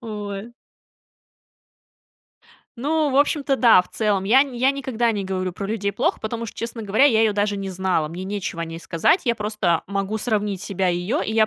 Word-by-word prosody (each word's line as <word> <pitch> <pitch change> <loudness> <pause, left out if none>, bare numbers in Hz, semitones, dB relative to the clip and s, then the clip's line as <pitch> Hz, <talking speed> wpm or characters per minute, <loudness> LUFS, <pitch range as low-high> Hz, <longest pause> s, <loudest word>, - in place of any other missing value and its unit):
Ой. 210 -1 -6 2.3
Ну, 300 +3 +1
в 265 - 0
общем-то, 285 -1 +2
да, 230 -8 +6
в - - -20
целом, 205 -3 0
я 255 +7 +6
нь 265 -4 -7
я 260 +3 +3
никогда 260 -4 -1
не 205 -2 -3
говорю 185 -1 -2
про 195 +2 -5
людей 205 -2 -1
плохо, 290 - 0
потому 230 +1 -4
что, - - -10
честно 230 0 -5
говоря, 215 +6 +3
я 225 -6 +5
ее 220 -1 +3
даже 205 0 0
не 195 -1 -4
знала, 185 -4 0
мне 175 +4 -7
нечего 190 -3 -4
о - - -2
ней 165 0 -7
сказать. 170 - +1
Я 235 -3 +2
просто 210 -6 0
могу 200 +2 -2
сравнить 210 -4 -1
себя 190 -2 -1
и 175 - +1
её, 195 - -1
и 220 - -2
я 220 -1 +4
210 Hz, 205 wpm, -22 LUFS, 195-235 Hz, 2.3 s, да